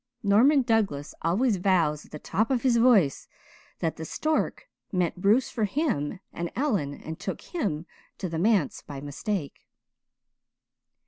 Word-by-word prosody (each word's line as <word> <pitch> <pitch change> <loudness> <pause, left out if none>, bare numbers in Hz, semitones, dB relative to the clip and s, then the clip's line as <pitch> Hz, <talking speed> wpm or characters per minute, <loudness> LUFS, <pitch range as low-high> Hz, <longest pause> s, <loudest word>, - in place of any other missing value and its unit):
Norman 250 +8 +5
Douglas 205 - 0
always 200 +7 +2
vows 170 -5 +1
at - - -26
the 150 - -6
top 220 +8 -1
of 255 -3 0
his 250 -3 +4
voice 225 - +4 0.5
that 165 - -1
the 160 - -5
stork 310 - -1 0.2
meant 180 -1 -1
Bruce 220 +7 +3
for 220 - 0
him 200 - -1
and 170 0 -4
Ellen 205 - 0
and 160 +2 -8
took 190 - -4
him 195 - -3 0.3
to 185 - -3
the 165 -2 -3
manse 195 -5 +2
by 140 -2 -8
mistake." 145 - -4
195 Hz, 145 wpm, -27 LUFS, 160-235 Hz, 0.5 s, Norman